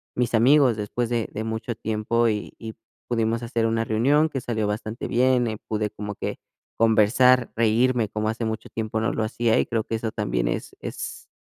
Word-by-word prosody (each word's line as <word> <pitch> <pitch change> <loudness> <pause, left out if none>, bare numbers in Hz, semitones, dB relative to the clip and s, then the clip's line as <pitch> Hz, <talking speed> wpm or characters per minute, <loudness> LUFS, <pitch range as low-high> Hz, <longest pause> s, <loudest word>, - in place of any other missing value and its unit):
mis 120 -1 0
amigos 125 0 +5
después 115 +3 -2
de 115 -2 -1
de 110 - -3
mucho 110 +1 -3
tiempo, 110 +2 0
y 105 -1 -3
y 110 -1 -7 0.3
pudimos 115 0 0
hacer 115 -1 -1
una 115 0 +1
reunión 140 +8 +2
que 135 -3 -3
salió 110 -4 -1
bastante 110 +2 -4
bien, 125 0 +3
eh, 110 -1 -3
pude 105 -1 -1
como 105 0 -6
que - - -4 0.4
conversar, 115 +3 +4
reírme, 115 0 +2
como 110 0 -2
hace 115 +1 -3
mucho 110 0 -4
tiempo 110 0 -3
no 110 - +1
lo 110 - -1
hacía, 115 +1 +1
y - - +2
creo 115 -2 -1
que 115 - -3
eso 110 -1 -3
también - - -1
es - - -3
es, - - -7
115 Hz, 195 wpm, -24 LUFS, 110-120 Hz, 0.4 s, amigos